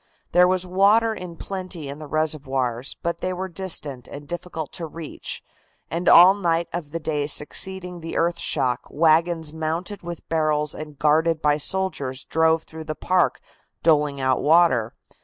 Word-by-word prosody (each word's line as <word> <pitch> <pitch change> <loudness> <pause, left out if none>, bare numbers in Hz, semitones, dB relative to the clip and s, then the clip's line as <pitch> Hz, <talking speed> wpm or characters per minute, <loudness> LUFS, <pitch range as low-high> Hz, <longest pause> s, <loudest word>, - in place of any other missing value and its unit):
There 180 0 +6
was 185 0 0
water 205 +5 +3
in 180 -5 -8
plenty 185 -5 -6
in 140 +2 -7
the 155 - -8
reservoirs, 135 -5 -2
but 170 0 -2
they 185 - -1
were 185 +1 -4
distant 165 -8 -2
and 145 0 -10
difficult 175 -2 -6
to 170 -3 -4
reach, 160 0 -6 0.5
and 170 +3 +1
all 180 +3 +9
night 170 -4 0
of 170 -4 -4
the 165 +3 -4
day 150 -2 -2
succeeding 180 +4 -1
the 165 0 -5
earth 170 +1 +1
shock 125 0 -1
wagons 160 0 +2
mounted 165 +5 -3
with 175 -1 -8
barrels 155 -2 0
and 150 -2 -9
guarded 155 +3 +2
by 150 -1 +2
soldiers 150 -6 -2
drove 160 0 +2
through 160 0 -10
the 155 0 -4
park 180 +2 +1 0.4
doling 150 -3 +3
out 130 -1 +1
water. 150 -8 +3
160 Hz, 160 wpm, -23 LUFS, 150-175 Hz, 0.5 s, all